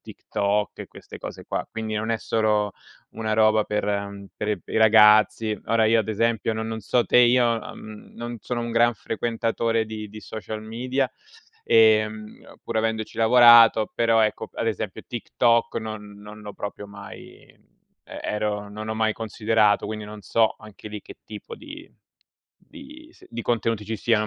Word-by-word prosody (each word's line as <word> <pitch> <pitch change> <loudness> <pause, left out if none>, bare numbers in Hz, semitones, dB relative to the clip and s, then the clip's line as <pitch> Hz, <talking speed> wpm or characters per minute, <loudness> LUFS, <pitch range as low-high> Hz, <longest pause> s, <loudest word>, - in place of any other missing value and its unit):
TikTok 100 +1 -2
e - - -7
queste - - -12
cose - - -8
qua. - - -3
Quindi 110 -1 -4
non 110 +1 -3
è 115 - +1
solo 105 -2 0 0.4
una 110 -1 -3
roba 110 0 +4
per 100 -1 -2 0.3
per 105 -1 -2
i - - -4
ragazzi. 110 0 +5
Ora, 115 -1 +2
io 115 +1 +4
ad 110 - -6
esempio 115 +1 0
no 110 - -3
non 110 0 -4
so 120 +4 +1
te, - - +3
io, 120 -1 +4 0.2
mhmm, 110 -1 -12
non 120 0 -6
sono 120 +3 -3
un 120 - -4
gran 120 +1 +3
frequentatore 115 0 -1
di 110 -1 -7
di 110 +1 -11
social 110 0 -7
media, 125 +4 -2 0.5
ehm, 110 -1 +2
pur - - -4
avendoci 110 0 -2
lavorato 115 -1 +7
però 115 -1 +3
ecco, 110 - -1
ad 115 - -3
esempio 105 -3 -3
TikTok 115 0 +1
non 110 -2 -6
non 105 +1 -12
l'ho 105 -1 -8
proprio 105 +1 -7
mai 100 0 -11
e - - -24 0.6
ero 105 -1 -2
non 110 +1 -7
ho 110 - -2
mai 110 0 +1
considerato 110 -1 +1
quindi, 110 -1 -5
non 105 0 -10
so, 115 +1 +1
anche 105 0 -12
lì 105 0 -7
che - - -13
tipo 105 -1 -9
di 310 +2 -12 0.7
di 300 +2 -14
s - - -20 0.2
contenuti 115 -2 -1
ci 110 +2 -4
siano. 110 0 +1
110 Hz, 165 wpm, -24 LUFS, 105-115 Hz, 0.7 s, lavorato